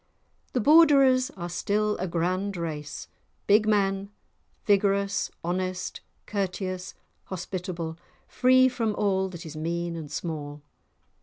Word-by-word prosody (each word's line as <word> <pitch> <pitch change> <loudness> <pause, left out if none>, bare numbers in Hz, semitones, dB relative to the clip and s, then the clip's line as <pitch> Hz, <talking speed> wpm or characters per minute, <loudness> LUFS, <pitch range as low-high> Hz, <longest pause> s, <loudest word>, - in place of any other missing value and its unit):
The 250 - +1
Borderers 275 -3 +6
are 175 -1 -4
still 210 +4 0
a 185 - -2
grand 185 +3 -1
race; 150 -3 -5 0.4
big 210 +1 +4
men, 195 -2 +1 0.6
vigorous, 200 -1 +2
honest, 185 +1 -3 0.2
courteous, 185 -2 -3 0.3
hospitable, 180 -3 -5 0.3
free 255 0 +5
from 230 -4 -1
all 190 -2 +1
that 175 -3 -9
is 155 -1 -8
mean 170 +2 -2
and 155 -3 -7
small. 150 -3 -5
190 Hz, 110 wpm, -27 LUFS, 170-210 Hz, 0.6 s, Borderers